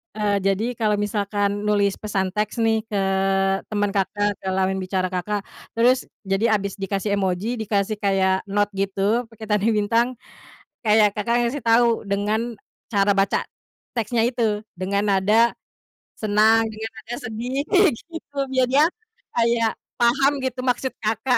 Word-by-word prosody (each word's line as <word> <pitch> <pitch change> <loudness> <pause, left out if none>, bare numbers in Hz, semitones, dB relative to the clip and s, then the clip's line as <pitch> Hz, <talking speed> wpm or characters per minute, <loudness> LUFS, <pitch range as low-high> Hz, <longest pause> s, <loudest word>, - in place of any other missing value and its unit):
eee, 210 -1 +1
jadi 195 +3 +1
kalau 210 -2 +2
misalkan 205 0 -1
nulis 200 -1 +2
pesan 190 -3 -1
teks 210 +3 -1
nih 225 -1 +2
ke 205 -2 -1 0.7
teman 205 -1 0
Kakak, 205 +1 0
ke - - -8
lawan 190 0 0
bicara 185 0 -1
Kakak, 200 +3 -2 0.4
terus 245 +3 +3 0.2
jadi 200 +4 +1
habis 200 -1 -3
dikasih 195 +1 -1
emoji, 195 +5 -1
dikasih 210 0 0
kayak 190 -2 +1
note 205 +1 +1
gitu, 200 +4 0
pakai 225 -1 -10
tanda 210 +1 +2
bintang, 220 +3 +2 0.8
kayak 210 -2 +4
Kakak 235 +3 +1
ngasih 275 +4 -4
tahu, 230 0 +3
dengan 215 +4 -1 0.4
cara 200 -1 +3
baca 195 0 +1 0.5
teksnya 230 0 0
itu 220 -4 -1 0.2
dengan 200 +2 0
nada 210 +4 +3 0.6
senang, 220 +1 +4
dengan 220 +1 -5
nada 225 +2 -6
sedih 240 +5 -3
kayak 390 -4 +5
gitu 325 -4 -11
biar 260 -1 +2
dia, 285 +4 +5 0.5
kayak 230 -1 +2 0.3
paham 270 +4 +4
gitu 260 -1 -3
maksud 255 +1 0
Kakak. 225 +4 +1
210 Hz, 145 wpm, -23 LUFS, 200-235 Hz, 0.8 s, kayak